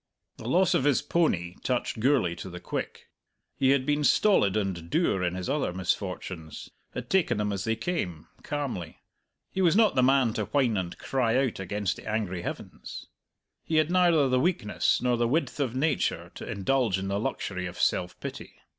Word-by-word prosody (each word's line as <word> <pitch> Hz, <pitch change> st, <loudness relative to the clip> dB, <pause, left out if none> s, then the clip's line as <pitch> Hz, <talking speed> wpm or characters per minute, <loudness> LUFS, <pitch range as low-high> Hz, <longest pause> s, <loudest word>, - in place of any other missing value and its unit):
The 110 Hz, -, -8 dB
loss 185 Hz, +4 st, +4 dB
of 175 Hz, -, +2 dB
his 145 Hz, -3 st, +3 dB
pony 90 Hz, -, 0 dB
touched 125 Hz, -2 st, -1 dB
Gourlay 125 Hz, -8 st, +2 dB
to 95 Hz, -, -7 dB
the 90 Hz, 0 st, -8 dB
quick. -, -, -5 dB, 0.5 s
He 130 Hz, -, +2 dB
had 135 Hz, -1 st, +3 dB
been 150 Hz, +1 st, +1 dB
stolid 140 Hz, -, +4 dB
and 95 Hz, -5 st, -2 dB
dour 100 Hz, -, +1 dB
in 90 Hz, 0 st, 0 dB
his 95 Hz, -1 st, -4 dB
other 140 Hz, -6 st, 0 dB
misfortunes, 90 Hz, -3 st, -4 dB, 0.2 s
had -, -, -5 dB
taken 175 Hz, -, +2 dB
them 105 Hz, -1 st, 0 dB
as 100 Hz, +2 st, -3 dB
they 115 Hz, 0 st, +1 dB
came, 95 Hz, -, -3 dB, 0.2 s
calmly; 125 Hz, -, -4 dB, 0.5 s
he 190 Hz, -, -1 dB
was 175 Hz, -1 st, +4 dB
not 220 Hz, -1 st, +5 dB
the 130 Hz, -, +3 dB
man 130 Hz, -3 st, +4 dB
to 110 Hz, -3 st, -2 dB
whine 130 Hz, -4 st, +1 dB
and 90 Hz, -3 st, -3 dB
cry 125 Hz, -3 st, 0 dB
out 120 Hz, -, -4 dB
against 100 Hz, +1 st, -2 dB
the -, -, -11 dB
angry 100 Hz, -5 st, -2 dB
heavens. -, -, -7 dB, 0.6 s
He 160 Hz, -, -2 dB
had 155 Hz, +1 st, +3 dB
neither 175 Hz, -6 st, +4 dB
the 130 Hz, 0 st, +2 dB
weakness 130 Hz, -, +1 dB
nor 125 Hz, -1 st, +2 dB
the 120 Hz, 0 st, +2 dB
width 155 Hz, +4 st, 0 dB
of 130 Hz, -4 st, -1 dB
nature 125 Hz, -, 0 dB
to -, -, -8 dB
indulge 115 Hz, 0 st, +1 dB
in 95 Hz, 0 st, -3 dB
the 100 Hz, +1 st, -1 dB
luxury 90 Hz, -3 st, -3 dB
of 90 Hz, -, -9 dB
self 90 Hz, 0 st, 0 dB
pity. -, -, -7 dB
115 Hz, 190 wpm, -28 LUFS, 95-145 Hz, 0.6 s, not